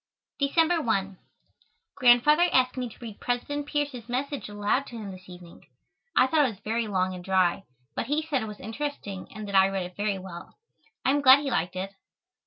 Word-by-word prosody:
December 325 +4 +2
1. 195 -6 -1 0.7
Grandfather 285 +7 +5
asked 255 -1 +3
me 250 -2 -3
to - - -15
read 225 -4 -8
President 285 +4 -2
Pierce's 285 -6 -3
message 270 0 -3
aloud 205 +6 0
to 240 - -10
him 205 -3 -6
this 185 0 -12
evening. 175 -1 -13 0.5
I - - +6
thought 295 +3 +3
it 265 - +2
was 205 -4 -10
very 225 +1 -1
long 185 -2 0
and 180 -1 -8
dry, 190 0 +1 0.3
but - - -3
he 295 +3 0
said 295 -5 -1
it 220 - -4
was 210 -1 -9
interesting 225 -4 -5
and 215 0 -7
that 200 - -6
I 190 0 +6
read 195 -2 -2
it 180 0 -10
very 205 -1 -1
well. 185 - -10 0.5
I - - +4
am 290 +1 +2
glad 270 +1 +8
he 280 -2 -3
liked 180 -3 -1
it. 190 +2 -4
225 Hz, 200 wpm, -27 LUFS, 195-280 Hz, 0.7 s, glad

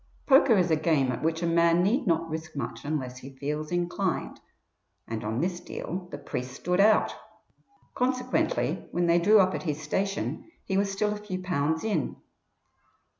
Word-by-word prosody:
Poker 270 -5 +6
is 180 -2 +2
a - - +5
game 155 -4 +2
at 120 - -4
which 160 +1 0
a - - +2
man 170 +1 +4
need 235 +6 +1
not 165 -1 +2
risk 160 0 -6
much 140 -5 -5
unless 130 -4 -3
he 135 +1 -12
feels 150 +3 -3
inclined, 175 +1 -1 0.7
and 110 -1 -4
on 110 +3 -2
this 175 0 -1
deal 180 +1 -6
the - - -6
priest 125 0 -5
stood 180 +7 -1
out. 210 +1 +4 0.8
Consequently, 255 - 0
when 175 - 0
they 170 0 +4
drew 210 +5 +6
up 185 -1 +4
at - - -3
his 155 -4 -2
station 195 - -2 0.2
he 190 - -2
was 200 0 +1
still 210 +2 0
a - - -5
few 205 -3 -5
pounds 160 -3 0
in. 220 -2 -1
175 Hz, 175 wpm, -27 LUFS, 155-195 Hz, 0.8 s, Poker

